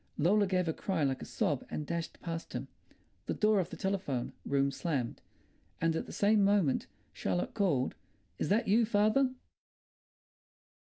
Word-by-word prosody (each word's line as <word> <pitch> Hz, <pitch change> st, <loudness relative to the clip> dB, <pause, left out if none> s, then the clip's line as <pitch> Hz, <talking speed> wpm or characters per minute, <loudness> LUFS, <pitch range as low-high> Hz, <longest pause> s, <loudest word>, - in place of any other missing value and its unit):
Lola 200 Hz, +6 st, +4 dB
gave 185 Hz, -2 st, +1 dB
a 160 Hz, -, +1 dB
cry 185 Hz, -3 st, -1 dB
like 135 Hz, -2 st, 0 dB
a -, -, -5 dB
sob 145 Hz, -4 st, -1 dB
and 150 Hz, -, -3 dB
dashed 170 Hz, +1 st, -4 dB
past 165 Hz, -1 st, -5 dB
him. -, -, -4 dB, 0.6 s
The -, -, -1 dB
door 215 Hz, -1 st, +3 dB
of 180 Hz, -2 st, -1 dB
the -, -, -8 dB
telephone 185 Hz, -11 st, -2 dB
room 140 Hz, 0 st, +2 dB
slammed, 140 Hz, -5 st, -2 dB, 0.6 s
and 165 Hz, 0 st, +1 dB
at -, -, -2 dB
the -, -, -8 dB
same 205 Hz, 0 st, +3 dB
moment 195 Hz, -8 st, +2 dB, 0.3 s
Charlotte 90 Hz, -1 st, -1 dB
called, 170 Hz, -, +1 dB, 0.5 s
"Is -, -, -1 dB
that 220 Hz, +3 st, +2 dB
you, 220 Hz, +4 st, +5 dB
father?" 215 Hz, +5 st, +3 dB
175 Hz, 160 wpm, -32 LUFS, 145-205 Hz, 0.6 s, you